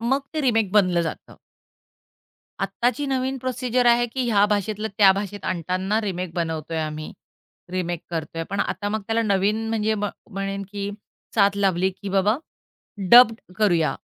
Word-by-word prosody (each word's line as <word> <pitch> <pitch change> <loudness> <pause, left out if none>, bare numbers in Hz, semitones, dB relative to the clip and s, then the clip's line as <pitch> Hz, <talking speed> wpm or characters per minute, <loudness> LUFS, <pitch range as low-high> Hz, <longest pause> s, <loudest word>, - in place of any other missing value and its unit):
मग 260 +4 +1
ते 310 - 0
रिमेक 225 -7 +2
बनलं 185 -4 +4
जातं. 165 - -6 1.2
आत्ताची 255 +4 -1
नवीन 265 0 -1
प्रोसिजर 255 -1 0
आहे, 240 0 +5
की 250 +2 -3
ह्या 205 -2 +5
भाषेतलं 210 +1 -1
त्या 195 -2 +8
भाषेत 200 +1 -5
आणताना 185 +4 -1
रिमेक 185 -4 -4
बनवतोय 160 -1 -3
आम्ही, 155 0 -5 0.6
रिमेक 175 -2 -2
करतोय. 165 0 -4
पण 200 0 -1
आता 205 - -2
मग 215 +1 -2
त्याला 230 0 +1
नवीन 210 +2 +1
म्हणजे 220 -1 0
म्ह 205 -1 -2 0.2
म्हणेन 195 0 -3
की 200 0 -4 0.4
साथ 200 -2 +3
लावली, 190 -2 +2
की 195 +2 -9
बाबा 195 +4 +2 0.7
डब्ड 235 -2 +8 0.2
करूया. 175 -7 +2
205 Hz, 150 wpm, -23 LUFS, 185-225 Hz, 1.2 s, त्या